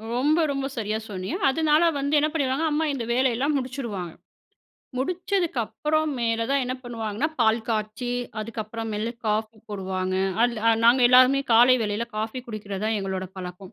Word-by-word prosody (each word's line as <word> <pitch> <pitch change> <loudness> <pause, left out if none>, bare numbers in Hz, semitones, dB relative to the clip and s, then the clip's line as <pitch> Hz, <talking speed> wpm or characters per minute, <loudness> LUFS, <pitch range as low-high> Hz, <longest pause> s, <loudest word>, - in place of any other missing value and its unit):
ரொம்ப, 300 +6 +2
ரொம்ப 275 -1 -2
சரியா 215 -1 -1
சொன்னீங்க. 190 - -4
அதனால 310 +3 +3 0.2
வந்து 285 +2 +1
என்ன 300 - +2
பண்ணிடுவாங்க, 280 0 0
அம்மா 315 +2 +1
இந்த 250 -4 -3
வேலையெல்லாம் 260 +3 +1
முடிச்சிருவாங்க. 235 - -4 0.9
முடிச்சதுக்கு 355 +1 -1
அப்புறம் 310 +4 0
மேல 230 -1 0
தான் 275 -1 +2
என்ன 250 +1 -2
பண்ணுவாங்கன்னா, 230 +3 -3
பால் 225 0 +3
காய்ச்சி 215 +2 -2 0.3
அதுக்கப்புறம் 225 0 -5
மேல 220 +3 -2
காஃபி 215 +1 -1
போடுவாங்க. 185 -2 -3 0.3
அதுல 230 -2 +3
நாங்க 240 +3 +6
எல்லாருமே 255 +2 +6
காலை 240 +3 +7
வேளையில 210 +2 -1
காஃபி 220 +4 -3
குடிக்கிறதுதான் 215 0 -3
எங்களோட 190 -1 -3
பழக்கம். 180 +1 -8
235 Hz, 145 wpm, -25 LUFS, 215-275 Hz, 0.9 s, காலை